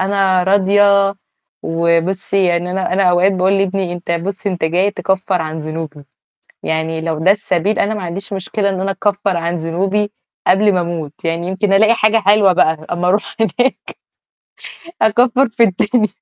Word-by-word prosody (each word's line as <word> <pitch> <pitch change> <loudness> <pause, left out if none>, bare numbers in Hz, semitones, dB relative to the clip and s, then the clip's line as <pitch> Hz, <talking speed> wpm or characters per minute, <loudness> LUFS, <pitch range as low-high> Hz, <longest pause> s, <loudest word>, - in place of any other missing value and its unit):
أنا 190 -1 +1
راضية 200 +1 +3 0.5
وبُصّي 170 +4 0
يعني 175 +1 -1
أنا 185 0 -2
أنا 195 - +2
أوقات 180 +1 +3
باقول 185 0 +1
لابني: 195 -2 -1
"أنت 175 0 -7
بُصّ 195 +4 -4
أنت 180 -4 -2
جاي 180 +5 +1
تكفّر 190 -3 -1
عن 160 0 -5
ذنوبي." 155 -2 -7 0.6
يعني 160 0 -2
لو 160 -1 -3
ده 185 +4 +4
السبيل 200 0 -1
أنا 210 - +1
ما 210 - -5
عنديش 195 +4 -5
مشكلة 200 +2 -2
إن 190 -1 -3
أنا 195 - -1
أكفّر 200 -2 -1
عن 170 +1 -2
ذنوبي 190 +6 -1 0.4
قبل 205 +2 +4
ما 180 - +1
أموت، 165 -3 -6
يعني 165 +1 -2
يمكن 195 +1 -1
ألاقي 215 +3 +5
حاجة 225 -1 +2
حلوة 205 -2 +4
بقى 170 -3 +3 0.2
أما 175 +1 -1
أروح 200 +3 0
هناك. 245 +5 -1 1.1
أكفّر 245 +4 +3
في 230 - 0
الدنيا. 215 +3 +1
190 Hz, 165 wpm, -16 LUFS, 170-200 Hz, 1.1 s, ألاقي